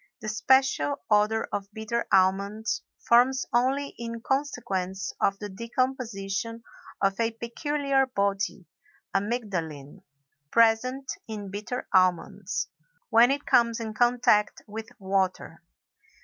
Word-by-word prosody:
The 215 - -5
special 225 - +3 0.2
odor 210 +1 +3
of 200 0 -4
bitter 220 +2 -2
almonds 200 +3 +2 0.3
forms 250 +3 +4
only 265 +4 +2
in 230 0 -5
consequence 200 -9 -2
of 195 - +2
the 205 - -6
decomposition 230 -1 -3 0.4
of 195 +1 +1
a 230 0 +2
peculiar 270 +4 0
body 200 -5 -1 0.5
(amygdalin), 195 - -3 0.5
present 235 - +2 0.2
in 205 -3 -6
bitter 210 +5 -5
almonds, 185 -2 +1 0.4
when 235 +2 +7
it 285 +1 -1
comes 235 -1 +3
in 220 -1 -4
contact 240 -2 +2
with 220 +1 -7
water. 190 -1 -1
220 Hz, 105 wpm, -27 LUFS, 195-245 Hz, 0.5 s, when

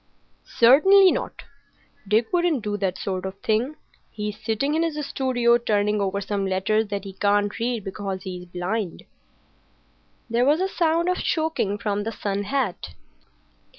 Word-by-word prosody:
"Certainly 370 +11 +7
not. - - -4 0.6
Dick 220 - +1
wouldn't 345 -8 +1
do 210 -1 -2
that 190 -2 -2
sort 185 -2 -3
of 190 0 -6
thing. 230 +7 0 0.3
He's 210 -1 -6
sitting 250 +7 0
in 320 - +1
his 330 -2 -1
studio, 245 -3 +2
turning 210 -2 +1
over 200 0 -1
some 195 0 -2
letters 210 +4 +1
that 200 -1 -4
he 195 -1 -8
can't 205 +1 +1
read 230 -2 -1
because 195 -1 -5
he's 180 -1 -7
blind." 180 +2 -4 1.2
There 235 +1 +1
was 295 +5 +3
a 380 - +1
sound 335 -2 +1
of 365 0 +1
choking 315 - 0
from 205 -1 -2
the 225 - -3
sun 200 -2 -3
hat. 210 - -2
215 Hz, 150 wpm, -24 LUFS, 200-270 Hz, 1.2 s, Certainly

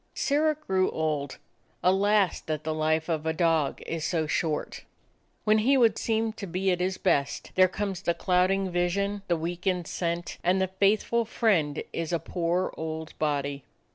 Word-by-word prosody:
Sirrah 305 +2 +2
grew 190 -11 0
old. 150 -3 -2 0.5
Alas, 195 +1 +3
that 155 -1 -2
the 155 - -2
life 155 0 0
of 160 -2 -2
a 160 - +1
dog 160 -4 +1
is 165 -1 -4
so 160 -1 0
short! 155 0 -2 0.6
When 215 0 +4
he 265 +6 +3
would 230 -4 +4
seem 225 -1 0
to 210 -3 -7
be 185 +2 0
at 180 - 0
his 185 +1 -1
best, 140 -1 0
there 185 0 +6
comes 195 -1 -3
the 170 -3 0
clouding 185 +1 +1
vision, 200 +3 0
the 170 - +1
weakened 175 +2 -2
scent, 170 +1 -3
and 180 +2 +3
the 190 -1 0
faithful 205 +5 +2
friend 185 -10 +1
is 165 0 -3
a 170 - +2
poor 175 +2 -1
old 160 0 -5
body. 145 -2 -1
180 Hz, 170 wpm, -27 LUFS, 160-200 Hz, 0.6 s, there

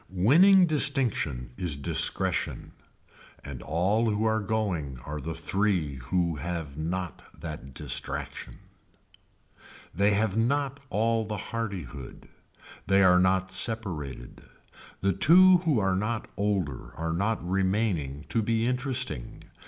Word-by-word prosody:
Winning 170 - +5
distinction 130 - +2
is 85 -6 0
discretion 70 - +1 0.7
and 70 -4 -8
all 100 +9 0
who 105 +1 0
are 110 0 +2
going 95 - -2
are 75 0 -5
the 80 +3 -5
three 85 -4 -1
who 85 +6 -1
have 80 -2 -5
not 85 +3 -4 0.2
that 75 -6 -8
distraction. - - -3 1.4
They 100 +4 +2
have 105 -1 0
not 135 +4 0
all 115 +2 +1
the 105 0 -4
hardihood. 95 - -6 0.6
They 100 0 +4
are 90 -1 +5
not 95 0 +1
separated. 90 - -4 0.6
The 95 0 +1
two 180 - +6
who 160 -7 +1
are 95 -2 +1
not 110 +4 -2
older 95 -10 -2
are 80 +1 -2
not 100 +1 -1
remaining 95 -7 -1
to 115 - 0
be 115 +1 0
interesting. 125 - -3
95 Hz, 120 wpm, -27 LUFS, 80-115 Hz, 1.4 s, two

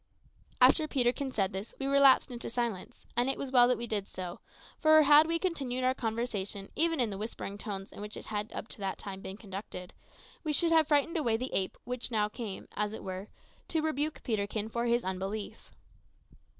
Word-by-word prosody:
After 310 -2 +6
Peterkin 265 0 +1
said 195 -7 0
this, 195 +4 -6
we 270 - -2
relapsed 275 -2 +5
into 240 -1 -5
silence; 235 -2 -4
and 245 +2 +2
it 270 - 0
was 270 - -4
well 245 -2 +7
that 250 - +2
we 235 - -3
did 210 -3 -2
so, 180 -2 -6 0.4
for 310 -1 +7
had 300 +2 +7
we 335 0 +2
continued 275 -9 -2
our 255 0 +3
conversation 220 -5 -3
even 330 -1 +2
in 235 -4 +1
the 195 - -5
whispering 210 -2 -5
tones 200 -2 -6
in - - -10
which 210 0 -6
it - - -8
had 210 0 -3
up - - -5
to - - -10
that 195 -1 -2
time 195 -1 -7
been 190 +1 -7
conducted, 195 -3 -8 0.5
we 305 -2 -1
should 335 +2 +2
have 320 -2 +5
frightened 305 +2 +2
away 235 -8 +2
the 255 +3 -4
ape 190 -1 0
which 250 0 -2
now 215 -3 +1
came, 210 -3 -6
as 210 0 0
it - - -7
were, 190 +1 -5 0.4
to 320 -2 -1
rebuke 310 -1 -1
Peterkin 215 -1 -1
for 235 +1 -1
his 235 +1 +2
unbelief. 195 +3 -4
235 Hz, 205 wpm, -31 LUFS, 205-275 Hz, 0.5 s, well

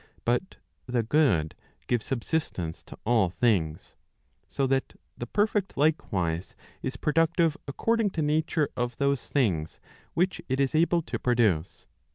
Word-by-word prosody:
But 125 +11 0 0.3
the 125 -2 +1
good 110 - +2 0.3
gives 120 -3 -1
subsistence 115 - -2
to - - -11
all 110 -5 +3
things. 90 -7 0 0.5
So 135 - -1
that 135 0 -1 0.2
the 120 - -6
perfect 205 - 0
likewise, 95 - 0 0.3
is 130 - -4
productive 165 +1 +2
according 225 +9 +1
to 160 - +2
nature 155 0 +1
of 120 -2 -2
those 140 -2 0
things 90 - 0 0.4
which 185 +2 +1
it 130 +1 0
is 135 -1 +2
able 170 +1 +3
to - - -4
produce. 110 -10 +1
130 Hz, 135 wpm, -27 LUFS, 110-160 Hz, 0.5 s, all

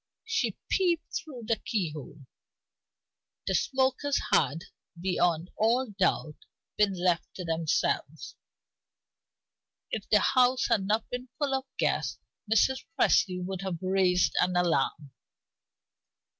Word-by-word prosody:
She 455 0 -1
peeped 345 -4 0
through 260 -7 -6
the 230 0 +1
keyhole; 155 - -4 1.2
the - - 0
smokers 265 +1 +1
had, 165 +4 +2 0.4
beyond 175 -2 0
all 235 +2 +1
doubt, 180 -6 0 0.4
been 210 -2 +3
left 175 -2 0
to 180 - -6
themselves. 165 -1 -1 1.6
If - - -4
the - - +6
house 255 0 +3
had 210 -5 +1
not 215 +2 +1
been 250 0 -5
full 285 -3 -1
of 265 0 -1
guests, - - 0 0.3
Mrs. 260 +4 +3 0.2
Presty 180 -1 +3
would 190 0 -4
now 190 -2 -3
have 165 - -6
raised 185 -1 +2
an 180 0 +1
alarm. 155 -4 0
195 Hz, 115 wpm, -28 LUFS, 175-255 Hz, 1.6 s, the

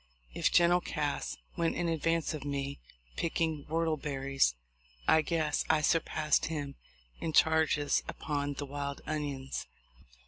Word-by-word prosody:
If - - +1
General 175 +1 +5
Cass 150 -4 -2 0.2
went 170 -2 +1
in 175 - 0
advance 165 0 +1
of 155 - -5
rne 140 0 -3 0.4
picking 160 -3 -1
whortleberries, 140 - +1 0.5
I 160 - +6
guess 155 -2 0
I 155 - +4
surpassed 155 -1 +2
.him 145 -3 -3 0.5
in 160 - -3
charges 160 -2 +4
upon 145 -1 -2
the 145 - -4
wild 140 0 -4
onions. 145 -3 -3
150 Hz, 125 wpm, -31 LUFS, 140-160 Hz, 0.5 s, I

